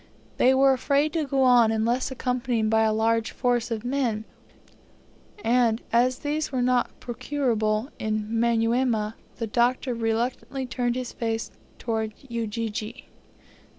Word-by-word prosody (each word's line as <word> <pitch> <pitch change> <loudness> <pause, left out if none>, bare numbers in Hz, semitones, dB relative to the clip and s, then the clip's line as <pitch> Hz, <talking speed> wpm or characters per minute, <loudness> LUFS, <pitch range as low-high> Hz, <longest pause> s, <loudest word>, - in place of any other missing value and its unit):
They 260 +1 +5
were 270 0 +5
afraid 280 +3 +1
to 315 -3 -1
go 275 -1 +2
on 245 -3 +5
unless 230 +4 0
accompanied 250 -3 -1
by 220 0 +4
a 220 0 +3
large 225 +1 +1
force 245 -1 0
of 230 0 -4
men; 245 -5 -1 1.2
and, 235 -2 +3
as 250 +2 +3
these 300 +1 -1
were 255 -2 0
not 250 0 +1
procurable 235 -3 -1
in 215 -1 -2
Manyuema, 230 0 +1 0.2
the 230 - -3
Doctor 245 +3 +1
reluctantly 235 +4 -2
turned 245 -1 -1
his 255 -1 -4
face 225 -1 -3 0.3
towards 220 -2 -2
Ujiji. 230 0 -4
235 Hz, 130 wpm, -25 LUFS, 225-255 Hz, 1.2 s, They